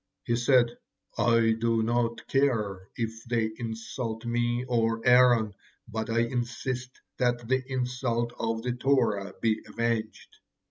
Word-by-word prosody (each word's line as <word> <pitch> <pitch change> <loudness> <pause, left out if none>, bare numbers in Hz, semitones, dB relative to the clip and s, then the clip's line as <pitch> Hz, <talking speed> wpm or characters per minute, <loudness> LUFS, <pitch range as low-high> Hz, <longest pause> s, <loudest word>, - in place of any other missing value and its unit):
He 120 - 0
said: 120 0 +3 0.4
"I 115 -1 +3
do 115 -1 +2
not 115 0 0
care 105 -9 0
if 115 -1 -4
they 115 -2 0
insult 115 0 -5
me 120 +1 0
or 115 -2 +1
Aaron, 125 -4 +5 0.3
but 110 0 -4
I 115 +1 +2
insist 125 +1 -3 0.2
that 120 -2 +1
the 130 +1 +1
insult 125 -2 -1
of 115 0 -1
the 125 - -1
Torah 120 -7 +1
be 110 -1 +1
avenged. 115 -2 -3
120 Hz, 130 wpm, -28 LUFS, 115-125 Hz, 0.4 s, Aaron